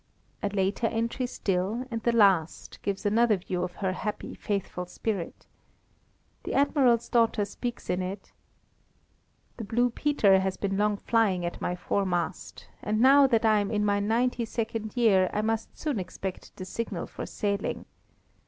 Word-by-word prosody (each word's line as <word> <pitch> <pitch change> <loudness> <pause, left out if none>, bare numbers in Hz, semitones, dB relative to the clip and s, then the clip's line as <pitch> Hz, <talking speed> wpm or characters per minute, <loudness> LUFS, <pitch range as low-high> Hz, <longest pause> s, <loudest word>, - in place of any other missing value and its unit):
A - - 0
later 200 +3 0
entry 230 +3 -1
still, 200 +2 -1
and 230 -1 -3
the 235 - +2
last, 190 -9 +2
gives 200 +1 -3
another 220 +1 +3
view 180 0 -4
of 180 0 -4
her 190 -2 -1
happy, 210 +3 -4
faithful 190 -3 -3
spirit. 195 -2 -4 1.0
The - - -3
Admiral's 265 -4 +3
daughter 230 -3 +2
speaks 240 +4 -6
in 180 - 0
it: 190 +2 -6 1.3
"The 230 - -5
Blue 240 +4 +1
Peter 225 -9 +3
has 190 0 -2
been 195 -1 -2
long 210 +1 +1
flying 200 -6 +1
at 175 - -5
my 180 - -1
foremast, 180 -1 -2
and 215 +1 -1
now 275 +3 +7
that 230 -3 +2
I 215 -1 +5
am 200 -1 -1
in 210 -1 0
my 205 0 +2
ninety 235 +4 +1
second 225 0 -4
year 195 -6 +4
I 210 - 0
must 225 0 -2
soon 295 -8 -2
expect 185 0 -6
the 185 - -7
signal 230 +4 -4
for - - -7
sailing. 200 -2 -2
210 Hz, 160 wpm, -27 LUFS, 190-230 Hz, 1.3 s, now